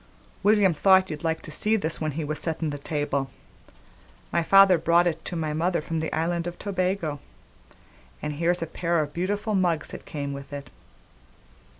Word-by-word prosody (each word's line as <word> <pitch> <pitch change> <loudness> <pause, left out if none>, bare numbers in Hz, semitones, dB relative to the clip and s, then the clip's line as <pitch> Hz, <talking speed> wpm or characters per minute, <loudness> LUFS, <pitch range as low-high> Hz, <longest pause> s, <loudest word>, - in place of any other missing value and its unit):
"William 205 -3 +4
thought 190 +3 +4
you'd 150 0 -6
like 160 0 -1
to 155 - -6
see 215 +8 +1
this, 165 -7 -2
when 155 -2 -1
he 160 +2 -3
was 150 +1 +1
settin' 160 -2 -1
the 145 - -5
table. 140 -2 -2 1.0
My 170 - +2
father 195 0 +6
brought 170 +2 +4
it 165 -2 -1
to 175 - -3
my 155 -2 -2
mother 170 +3 0
from 165 +1 -3
the 160 - -3
island 170 +1 -1
of 175 - -6
Tobago; 185 -6 -2 1.0
an' 150 - -3
here's 170 +3 0
a - - -2
pair 170 +1 -1
of 145 -1 -4
beautiful 205 +5 -2
mugs 175 -5 +1
that - - -9
came 140 -2 -4
with 140 0 -9
it." 140 -3 -7
165 Hz, 185 wpm, -26 LUFS, 150-185 Hz, 1.0 s, father